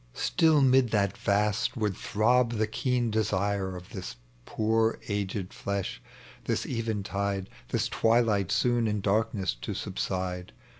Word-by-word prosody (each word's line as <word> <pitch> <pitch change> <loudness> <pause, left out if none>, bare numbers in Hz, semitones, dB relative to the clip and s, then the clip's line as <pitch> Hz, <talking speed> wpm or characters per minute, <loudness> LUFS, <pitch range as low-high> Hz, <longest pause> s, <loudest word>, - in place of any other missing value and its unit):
— - - -30
StiU 155 -4 +3
'mid 130 -1 +4
that 100 -3 +1
vast 105 +5 0
would 105 -4 0
throb 120 +5 +2
the 110 -1 +1
keen 120 +1 0
desire 100 -2 0
Of 90 +2 -10
this 95 - -7 0.3
poor 110 +1 +1
aged 100 -2 -3
flesh, 100 -11 -3 0.4
this - - -1
eventide, 100 -4 -2 0.2
This - - 0
twilight 110 -5 +2
soon 120 +2 +2
in 105 -1 -1
darkness 100 -1 0
to - - -4
subside. 90 -1 -3
105 Hz, 135 wpm, -28 LUFS, 100-115 Hz, 0.4 s, mid